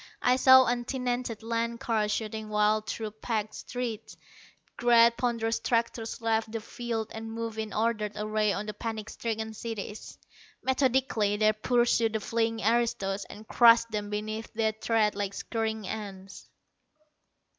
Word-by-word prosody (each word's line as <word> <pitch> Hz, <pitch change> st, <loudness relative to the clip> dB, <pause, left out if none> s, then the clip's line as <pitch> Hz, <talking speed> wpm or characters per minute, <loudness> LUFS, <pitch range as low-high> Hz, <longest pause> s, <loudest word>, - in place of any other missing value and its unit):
I 250 Hz, -, +5 dB
saw 260 Hz, 0 st, +8 dB
untenanted 245 Hz, -1 st, -2 dB
land 230 Hz, +1 st, -2 dB
cars 215 Hz, -2 st, 0 dB
shooting 215 Hz, 0 st, -3 dB
wild 210 Hz, 0 st, +2 dB
through 220 Hz, -2 st, -4 dB
packed 215 Hz, 0 st, -3 dB
streets. 235 Hz, -3 st, -5 dB, 0.6 s
Great 235 Hz, -1 st, +5 dB
ponderous 230 Hz, -2 st, 0 dB
tractors 230 Hz, -1 st, -1 dB
left 225 Hz, -1 st, 0 dB
the 225 Hz, -, -3 dB
fields 225 Hz, 0 st, -4 dB
and 225 Hz, 0 st, -6 dB
moved 225 Hz, -1 st, -4 dB
in 220 Hz, -1 st, -3 dB
ordered 215 Hz, -1 st, 0 dB
array 215 Hz, 0 st, 0 dB
on 200 Hz, +1 st, -3 dB
the 210 Hz, -, -5 dB
panic 220 Hz, 0 st, -5 dB
stricken 220 Hz, -1 st, -4 dB
cities. 215 Hz, -1 st, -6 dB, 0.5 s
Methodically 260 Hz, -6 st, +1 dB
they 215 Hz, 0 st, +4 dB
pursued 235 Hz, 0 st, +2 dB
the 220 Hz, -, 0 dB
fleeing 225 Hz, +1 st, -1 dB
aristos, 210 Hz, -4 st, +1 dB
and 215 Hz, +1 st, -12 dB
crushed 230 Hz, -1 st, +6 dB
them 210 Hz, -1 st, -3 dB
beneath 215 Hz, +2 st, -4 dB
their 220 Hz, -1 st, +2 dB
tread 220 Hz, -1 st, +1 dB
like 200 Hz, -1 st, -3 dB
scurrying 220 Hz, -2 st, -3 dB
ants. 195 Hz, -2 st, -7 dB
225 Hz, 140 wpm, -28 LUFS, 215-235 Hz, 0.6 s, saw